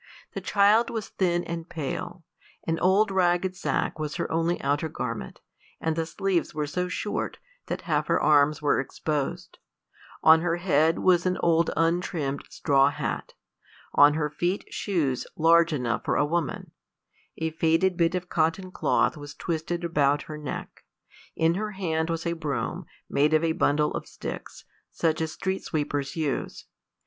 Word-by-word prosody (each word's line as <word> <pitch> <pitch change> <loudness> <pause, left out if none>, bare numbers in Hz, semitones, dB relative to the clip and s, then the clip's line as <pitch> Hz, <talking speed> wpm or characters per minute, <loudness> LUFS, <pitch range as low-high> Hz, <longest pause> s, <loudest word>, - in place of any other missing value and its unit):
The - - -4
child 210 +3 +4
was 225 -3 -4
thin 175 -2 0
and 170 0 -6
pale; 160 +2 -5 0.4
an 165 0 -1
old 195 +3 +3
ragged 185 0 +2
sacque 185 - -1
was 150 -1 -3
her - - -3
only 165 +2 +1
outer 145 +3 0
garment, - - -5 0.4
and 160 -1 -1
the 165 0 -1
sleeves 185 -1 -1
were 150 -1 -1
so 180 +5 -2
short 205 +3 -3 0.3
that - - -3
half - - 0
her - - +2
arms 150 0 +3
were 145 - +3
exposed; 145 +1 -3 0.6
on 160 0 +7
her 170 -1 +1
head 165 -2 +2
was 180 -1 +3
an 185 - 0
old 170 0 +3
untrimmed 165 -4 0
straw 140 -2 +3
hat; - - -4 0.6
on 145 +1 +6
her 150 -1 0
feet 175 +5 -1
shoes 150 - -1
large 165 +1 +5
enough 125 -5 -1
for - - 0
a 145 - +3
woman; 160 -1 -2 0.7
a 160 0 -2
faded 165 +3 +2
bit 170 0 +2
of 180 0 -3
cotton 165 +3 0
cloth - - +1
was 145 -1 -9
twisted 170 +1 -3
about 145 -3 +2
her 155 - -7
neck; 150 -3 -7 0.5
in 165 0 +3
her 210 +3 -3
hand 160 -4 -1
was 165 0 -2
a 170 - 0
broom, 145 -8 -3 0.2
made 150 +2 +2
of 155 - +2
a 165 - +2
bundle 150 -1 +1
of - - -5
sticks, - - -8 0.3
such 160 -1 0
as 160 -1 -1
street 190 0 -3
sweepers 145 -3 -2
use. 155 -5 -3
165 Hz, 160 wpm, -26 LUFS, 150-175 Hz, 0.7 s, on